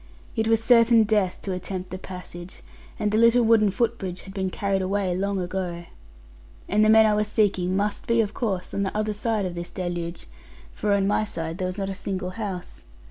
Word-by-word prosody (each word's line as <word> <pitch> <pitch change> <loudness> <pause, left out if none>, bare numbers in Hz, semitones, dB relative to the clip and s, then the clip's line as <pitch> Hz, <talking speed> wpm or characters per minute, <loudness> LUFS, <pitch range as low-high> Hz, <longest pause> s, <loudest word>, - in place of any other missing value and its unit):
It 220 -1 0
was 225 0 +3
certain 230 -1 +6
death 205 -4 0
to 195 - -3
attempt 185 0 -5
the 185 - -5
passage: 180 -1 -9 0.3
and 210 -1 0
the 215 - +2
little 230 +1 +5
wooden 220 -2 +5
footbridge 195 -4 -2
had 190 - -11
been 190 -1 -1
carried 195 0 -1
away 190 -1 0
long 195 +1 -1
ago. 175 -1 -4 0.8
And 210 +2 +3
the 215 - +4
men 220 0 +7
I 215 - +3
was 210 0 +1
seeking 195 -4 +1
must 205 +1 -1
be, 230 0 +3
of 215 -2 +1
course, 195 -7 -3
on 200 - -1
the 200 +1 -2
other 215 0 0
side 215 -1 -1
of 180 - -3
this 170 0 -5
deluge, 175 -2 -4 0.5
for 210 - -2
on 200 -1 +2
my 205 +2 +2
side 165 -4 -5
there 185 - -1
was 185 +1 -5
not 195 -1 -2
a - - -3
single 185 -1 -4
house. 190 -4 -6
200 Hz, 210 wpm, -25 LUFS, 185-215 Hz, 0.8 s, men